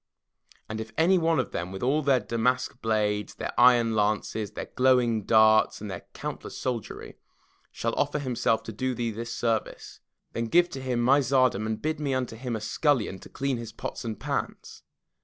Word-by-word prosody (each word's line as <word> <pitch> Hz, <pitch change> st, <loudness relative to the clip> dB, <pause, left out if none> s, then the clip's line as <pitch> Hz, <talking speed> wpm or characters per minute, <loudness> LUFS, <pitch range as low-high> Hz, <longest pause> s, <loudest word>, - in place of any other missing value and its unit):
And 110 Hz, 0 st, -4 dB
if 110 Hz, 0 st, -8 dB
any 180 Hz, +3 st, +4 dB
one 165 Hz, -1 st, +2 dB
of 125 Hz, -, -2 dB
them 85 Hz, +2 st, -4 dB
with 95 Hz, +3 st, -6 dB
all 140 Hz, +5 st, +2 dB
their 135 Hz, -3 st, +3 dB
damask 120 Hz, +3 st, -1 dB
blades, 105 Hz, -2 st, 0 dB
their -, -, -5 dB
iron 120 Hz, -2 st, +5 dB
lances, 105 Hz, 0 st, -1 dB
their -, -, -5 dB
glowing 125 Hz, -5 st, +2 dB
darts, 110 Hz, -1 st, +5 dB
and 105 Hz, -1 st, -6 dB
their -, -, -8 dB
countless -, -, -6 dB
soldiery, 120 Hz, -5 st, -5 dB, 0.5 s
shall -, -, -2 dB
offer -, -, 0 dB
himself 125 Hz, -5 st, 0 dB
to -, -, -6 dB
do 130 Hz, +4 st, -2 dB
thee 115 Hz, -1 st, -2 dB
this 115 Hz, +2 st, -6 dB
service, 115 Hz, -2 st, -2 dB, 0.3 s
then 115 Hz, -, -2 dB
give 175 Hz, +9 st, +4 dB
to 135 Hz, -, -6 dB
him 125 Hz, -2 st, -1 dB
my 135 Hz, +4 st, +5 dB
tsardom 130 Hz, -6 st, +2 dB
and 110 Hz, -1 st, -4 dB
bid 155 Hz, 0 st, -1 dB
me 145 Hz, -2 st, -2 dB
be -, -, +1 dB
unto 125 Hz, -3 st, -2 dB
him 120 Hz, 0 st, -4 dB
a 110 Hz, -, -4 dB
scullion, 110 Hz, -4 st, 0 dB
to -, -, -13 dB
clean 135 Hz, -1 st, -2 dB
his 115 Hz, -1 st, -7 dB
pots -, -, -6 dB
and 110 Hz, -2 st, -5 dB
pans. -, -, -4 dB
120 Hz, 195 wpm, -27 LUFS, 110-130 Hz, 0.5 s, iron